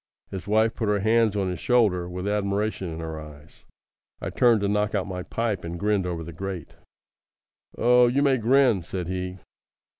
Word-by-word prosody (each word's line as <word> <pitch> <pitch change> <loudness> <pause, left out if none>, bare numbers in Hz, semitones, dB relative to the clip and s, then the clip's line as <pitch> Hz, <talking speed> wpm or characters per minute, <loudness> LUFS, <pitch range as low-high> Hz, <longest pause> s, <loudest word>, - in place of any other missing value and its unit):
His 95 -1 -6
wife 110 +2 +3
put 110 - -3
her 105 0 +2
hands 110 0 +3
on 95 -2 0
his 90 -2 -3
shoulder 100 -8 +2
with 90 +2 -5
admiration 100 -1 -1
in 80 +1 -6
her 80 -1 -5
eyes. 75 0 -14 0.5
I - - -4
turned 115 -4 +4
to 100 - +1
knock 105 +1 0
out 95 - 0
my 90 -1 -5
pipe, 110 +1 -2
and 85 +1 -5
grinned 100 -2 +1
over 85 -2 -3
the 85 +1 -9
grate. 95 -1 -6 1.0
"Oh, 125 +1 +5
you 135 +4 +2
may 135 -3 +3
grin," 120 -3 +4
said 90 +1 -5
he. 90 0 -4
100 Hz, 185 wpm, -25 LUFS, 90-110 Hz, 1.0 s, Oh